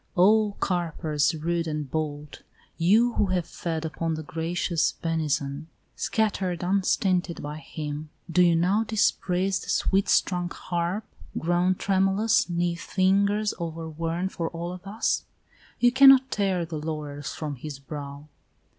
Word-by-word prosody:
Oh, 205 Hz, +3 st, +4 dB
carpers 160 Hz, -3 st, 0 dB
rude 165 Hz, +2 st, -1 dB
and 150 Hz, -2 st, -3 dB
bold, 150 Hz, 0 st, -4 dB, 0.4 s
You 220 Hz, +8 st, +4 dB
who 205 Hz, -, +1 dB
have 180 Hz, -2 st, 0 dB
fed 165 Hz, -2 st, -4 dB
upon 160 Hz, 0 st, -2 dB
the 155 Hz, -, -6 dB
gracious 165 Hz, +1 st, -1 dB
benison 155 Hz, -2 st, -2 dB, 0.3 s
Scattered 190 Hz, -6 st, -1 dB
unstinted 185 Hz, -1 st, +1 dB
by 150 Hz, +1 st, -5 dB
him, 150 Hz, -1 st, -6 dB, 0.2 s
do 180 Hz, +1 st, +2 dB
you 170 Hz, -1 st, +5 dB
now 185 Hz, +6 st, +2 dB
Dispraise 195 Hz, -3 st, +1 dB
the -, -, -10 dB
sweet 195 Hz, 0 st, +1 dB
strung 175 Hz, -2 st, +2 dB
harp, 175 Hz, +5 st, -3 dB, 0.3 s
grown 175 Hz, +2 st, +2 dB
tremulous 195 Hz, +3 st, +2 dB
'Neath 175 Hz, 0 st, -1 dB
fingers 200 Hz, +2 st, +2 dB
overworn 165 Hz, +1 st, -3 dB
for 165 Hz, -3 st, -3 dB
all 170 Hz, +1 st, -5 dB
of 180 Hz, +2 st, -10 dB
us? 215 Hz, +3 st, 0 dB, 0.6 s
You 245 Hz, 0 st, +5 dB
cannot 265 Hz, 0 st, +7 dB
tear 190 Hz, -4 st, 0 dB
the 160 Hz, -2 st, -5 dB
laurels 150 Hz, -2 st, -5 dB
from 150 Hz, -3 st, -5 dB
his 145 Hz, +2 st, -7 dB
brow. 140 Hz, +1 st, -8 dB
175 Hz, 135 wpm, -26 LUFS, 155-195 Hz, 0.6 s, cannot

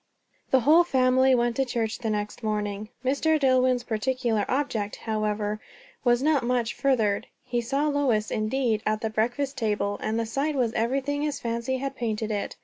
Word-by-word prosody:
The 265 Hz, -, +4 dB
whole 315 Hz, +7 st, +6 dB
family 260 Hz, -3 st, +3 dB
went 240 Hz, -1 st, +1 dB
to 270 Hz, -, +3 dB
church 225 Hz, -3 st, -2 dB
the 230 Hz, -3 st, -2 dB
next 210 Hz, +1 st, -3 dB
morning. 210 Hz, -1 st, -2 dB, 0.2 s
Mr. 305 Hz, +4 st, +2 dB
Dillwyn's 255 Hz, -2 st, +3 dB
particular 230 Hz, -1 st, 0 dB
object, 240 Hz, -7 st, -1 dB
however, 215 Hz, -1 st, -2 dB, 0.4 s
was 240 Hz, 0 st, +3 dB
not 300 Hz, -3 st, +3 dB
much 240 Hz, -1 st, 0 dB
furthered. 225 Hz, -7 st, +1 dB, 0.2 s
He 240 Hz, -1 st, -1 dB
saw 275 Hz, +5 st, 0 dB
Lois, 265 Hz, -8 st, +1 dB
indeed, 220 Hz, 0 st, 0 dB
at 215 Hz, 0 st, 0 dB
the 220 Hz, -, -2 dB
breakfast 245 Hz, +6 st, -1 dB
table; 210 Hz, -2 st, -1 dB
and 220 Hz, +1 st, -1 dB
the 230 Hz, -, 0 dB
sight 280 Hz, +7 st, -1 dB
was 240 Hz, -4 st, +1 dB
everything 275 Hz, +5 st, 0 dB
his 295 Hz, -1 st, -2 dB
fancy 235 Hz, +2 st, -2 dB
had 275 Hz, +1 st, -4 dB
painted 220 Hz, -3 st, -2 dB
it. 205 Hz, -1 st, -3 dB
240 Hz, 170 wpm, -26 LUFS, 215-270 Hz, 0.4 s, whole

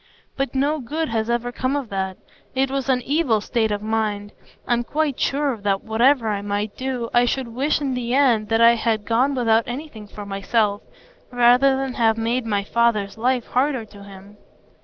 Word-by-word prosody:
But 275 Hz, 0 st, -3 dB
no 290 Hz, +3 st, +1 dB
good 305 Hz, +5 st, -3 dB
has 225 Hz, 0 st, -1 dB
ever 240 Hz, 0 st, -1 dB
come 255 Hz, +2 st, -2 dB
of 275 Hz, -6 st, -3 dB
that; 190 Hz, -1 st, -3 dB, 0.4 s
it 265 Hz, 0 st, +1 dB
was 275 Hz, 0 st, -2 dB
an 250 Hz, -2 st, +2 dB
evil 280 Hz, -6 st, +1 dB
state 220 Hz, +1 st, -1 dB
of 205 Hz, 0 st, -3 dB
mind. 215 Hz, -2 st, -2 dB, 0.4 s
I'm 240 Hz, 0 st, +1 dB
quite 295 Hz, +1 st, -1 dB
sure 280 Hz, -2 st, 0 dB
that 200 Hz, -1 st, -1 dB
whatever 235 Hz, +2 st, +2 dB
I 205 Hz, -1 st, -2 dB
might 205 Hz, +1 st, -3 dB
do, 255 Hz, -3 st, -4 dB
I 240 Hz, 0 st, +4 dB
should 255 Hz, 0 st, -2 dB
wish 270 Hz, +7 st, 0 dB
in 275 Hz, -3 st, -2 dB
the 245 Hz, 0 st, -2 dB
end 240 Hz, -7 st, +3 dB
that 225 Hz, 0 st, +2 dB
I 230 Hz, 0 st, +7 dB
had 225 Hz, -2 st, -1 dB
gone 255 Hz, +5 st, +1 dB
without 230 Hz, -2 st, +2 dB
anything 245 Hz, -4 st, -7 dB
for 205 Hz, 0 st, -9 dB
myself, 200 Hz, +1 st, 0 dB, 0.5 s
rather 250 Hz, +2 st, +4 dB
than 270 Hz, -1 st, -3 dB
have 225 Hz, -2 st, +2 dB
made 230 Hz, +2 st, -1 dB
my 205 Hz, -2 st, 0 dB
father's 215 Hz, -2 st, 0 dB
life 245 Hz, +1 st, 0 dB
harder 260 Hz, -2 st, 0 dB
to 205 Hz, -1 st, -15 dB
him." 200 Hz, +1 st, -13 dB
235 Hz, 190 wpm, -22 LUFS, 215-265 Hz, 0.5 s, I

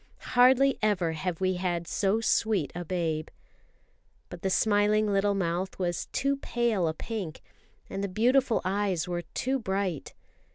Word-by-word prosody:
Hardly 260 Hz, +2 st, +5 dB
ever 195 Hz, -6 st, +1 dB
have 165 Hz, +1 st, -3 dB
we 185 Hz, -1 st, 0 dB
had 175 Hz, -2 st, -2 dB
so 205 Hz, +2 st, +1 dB
sweet 215 Hz, -8 st, +1 dB
a 175 Hz, -, -5 dB
babe. 165 Hz, -3 st, -2 dB, 1.0 s
But -, -, -8 dB
the 190 Hz, -, 0 dB
smiling 210 Hz, +1 st, +2 dB
little 200 Hz, +1 st, +2 dB
mouth 180 Hz, 0 st, -2 dB
was 175 Hz, -2 st, -2 dB
too 275 Hz, +1 st, 0 dB
pale 235 Hz, -9 st, 0 dB
a 160 Hz, -, -1 dB
pink, 195 Hz, -5 st, -5 dB, 0.5 s
and 195 Hz, -, -4 dB
the -, -, 0 dB
beautiful 240 Hz, +5 st, +2 dB
eyes 190 Hz, -2 st, 0 dB
were 175 Hz, -1 st, -2 dB
too 265 Hz, +1 st, 0 dB
bright. 190 Hz, -, -3 dB
195 Hz, 150 wpm, -28 LUFS, 175-220 Hz, 1.0 s, Hardly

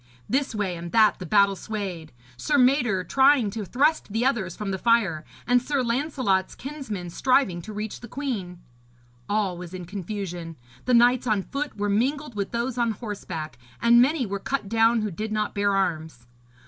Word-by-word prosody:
This 265 Hz, -2 st, 0 dB
way 195 Hz, -4 st, -1 dB
and 170 Hz, 0 st, -7 dB
that 220 Hz, -2 st, +4 dB
the 180 Hz, -, -6 dB
battle 200 Hz, +1 st, +4 dB
swayed; 190 Hz, -6 st, -5 dB, 0.2 s
Sir 290 Hz, -, 0 dB
Mador 250 Hz, -7 st, +3 dB
trying 265 Hz, -2 st, +4 dB
to 220 Hz, +1 st, -4 dB
thrust 275 Hz, -, +1 dB
the 225 Hz, +4 st, 0 dB
others 215 Hz, -10 st, 0 dB
from 205 Hz, -2 st, -4 dB
the 190 Hz, -, -3 dB
fire, 200 Hz, -9 st, +2 dB, 0.2 s
and 245 Hz, 0 st, +3 dB
Sir 275 Hz, 0 st, -1 dB
Lancelot's 240 Hz, -6 st, 0 dB
kinsmen 250 Hz, -, -6 dB
striving 225 Hz, -5 st, +2 dB
to 215 Hz, -, -9 dB
reach 210 Hz, 0 st, -5 dB
the 240 Hz, -, -10 dB
queen. 215 Hz, -10 st, -4 dB, 0.7 s
All 205 Hz, -3 st, 0 dB
was 180 Hz, 0 st, -8 dB
in 180 Hz, -1 st, -7 dB
confusion; 180 Hz, -3 st, -5 dB, 0.3 s
the 250 Hz, -, +3 dB
knights 245 Hz, +1 st, +4 dB
on 210 Hz, -3 st, +1 dB
foot 285 Hz, +3 st, -5 dB
were 205 Hz, 0 st, -1 dB
mingled 260 Hz, +7 st, 0 dB
with 200 Hz, -2 st, -3 dB
those 240 Hz, +1 st, -2 dB
on 235 Hz, -2 st, +1 dB
horseback, 170 Hz, -, -6 dB, 0.2 s
and 235 Hz, +1 st, +6 dB
many 275 Hz, +1 st, +2 dB
were 200 Hz, -1 st, -4 dB
cut 265 Hz, +1 st, -3 dB
down 225 Hz, +1 st, +3 dB
who 210 Hz, -, -2 dB
did 215 Hz, +5 st, -5 dB
not 215 Hz, -1 st, -1 dB
bear 200 Hz, -1 st, +1 dB
arms. 160 Hz, -9 st, -2 dB
215 Hz, 180 wpm, -25 LUFS, 190-250 Hz, 0.7 s, and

